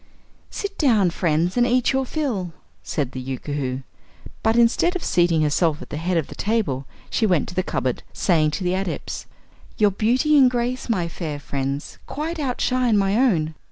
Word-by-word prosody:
"Sit 405 0 -5
down, 220 - +4
friends, 170 +1 0
and 240 0 +4
eat 250 +1 +2
your 265 -1 0
fill," 225 - -2 0.3
said 140 -4 -2
the 130 - -5
Yookoohoo, 130 0 -3 0.6
but 220 +1 +2
instead 240 +10 +3
of 365 - -3
seating 170 -3 +3
herself 150 +1 +2
at - - -11
the - - -3
head 175 +3 0
of 160 - +1
the - - -10
table 200 - -1 0.2
she 220 - +2
went 180 -6 +2
to - - -8
the 185 - +1
cupboard, 130 -8 -2
saying 155 -4 +2
to 155 - -4
the 180 0 +1
Adepts: 190 -2 -4 0.5
"Your 210 -2 +4
beauty 250 +10 +2
and 260 -2 +7
grace, 245 +1 -2
my 180 -7 +1
fair 160 -3 -5
friends, 140 0 -4
quite 320 +3 -4
outshine 250 -4 +1
my 195 0 +2
own. 180 -11 +2
185 Hz, 180 wpm, -23 LUFS, 155-245 Hz, 0.6 s, and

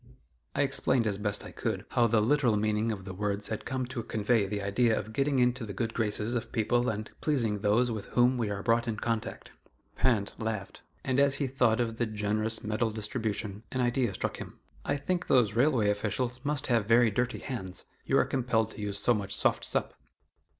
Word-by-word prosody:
'" 60 -3 -43
I - - +3
explained, 120 -3 +1
as 105 -2 -1
best 105 -1 -1
I - - -8
could, - - -3
how 120 - +3
the 110 -1 +3
literal 125 -3 +3
meaning 105 +1 +1
of 95 -3 -6
the 95 - -6
words 100 +1 -2
had 110 - -4
come 130 -1 -2
to 125 -1 -5
convey 110 -1 +1
the 100 0 -3
idea 110 +3 +2
of 110 +1 -5
getting 140 +2 +1
into 125 0 +2
the 105 -2 -5
good 115 +3 -2
graces 110 0 0
of 120 -2 -3
people 120 +2 +1
and 110 0 -4
pleasing 115 -9 +1
those 110 +4 +2
with 110 -3 -5
whom 125 +1 +3
we 115 -4 -1
are 100 -1 -4
brought 115 +2 +2
in 110 -2 -2
contact. 115 0 -3 0.4
Pinte 115 -6 +1
laughed, 110 -4 -4 0.2
and 130 0 +1
as 140 -1 +4
he 140 - -1
thought 125 -3 +2
of 115 -2 -1
the 120 - 0
generous 110 +1 -1
medal 110 +2 0
distribution, 105 -2 -3
an 130 - -1
idea 120 -2 +1
struck - - -3
him: - - -9 0.3
"I - - 0
think 180 +5 -2
those 120 -6 +4
railway 120 -4 +3
officials 120 +5 -2
must 145 -1 -1
have 115 -6 +1
very 115 0 +5
dirty 125 +4 -1
hands 95 -9 -6 0.2
you - - +2
are - - +4
compelled 115 -4 0
to 110 - -9
use 100 -1 -2
so 120 - +3
much 100 -3 -3
'soft - - +1
sup. - - -1
115 Hz, 210 wpm, -29 LUFS, 105-125 Hz, 0.4 s, very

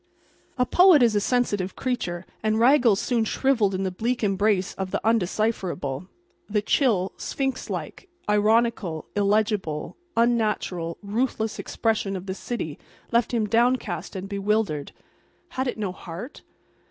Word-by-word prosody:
A 250 - +3
poet 355 -2 +6
is 230 -2 +4
a 205 - +3
sensitive 205 -6 0
creature, 185 -9 -3 0.2
and 215 0 +1
Raggles 240 -4 +5
soon 240 -3 +1
shrivelled 220 -4 +1
in 190 - -1
the 190 - -1
bleak 235 +6 -2
embrace 200 -1 +1
of 190 -1 -4
the - - -1
undecipherable. 185 -8 0 0.4
The 210 0 0
chill, 210 -8 +2
sphinx 270 -1 -3
like, 380 - -6 0.2
ironical, 210 -5 +2
illegible, 205 -6 0 0.2
unnatural, 210 -8 +1
ruthless 220 +1 -1
expression 215 -3 -1
of 185 0 -6
the 190 - -3
city 190 -7 -5 0.3
left 235 -1 +2
him 230 -3 +1
downcast 235 +1 0
and 190 +1 -5
bewildered. 200 -7 -1 0.6
Had 260 -5 -2
it 250 - -2
no 205 -4 -2
heart? 180 - -9
215 Hz, 135 wpm, -25 LUFS, 190-235 Hz, 0.6 s, poet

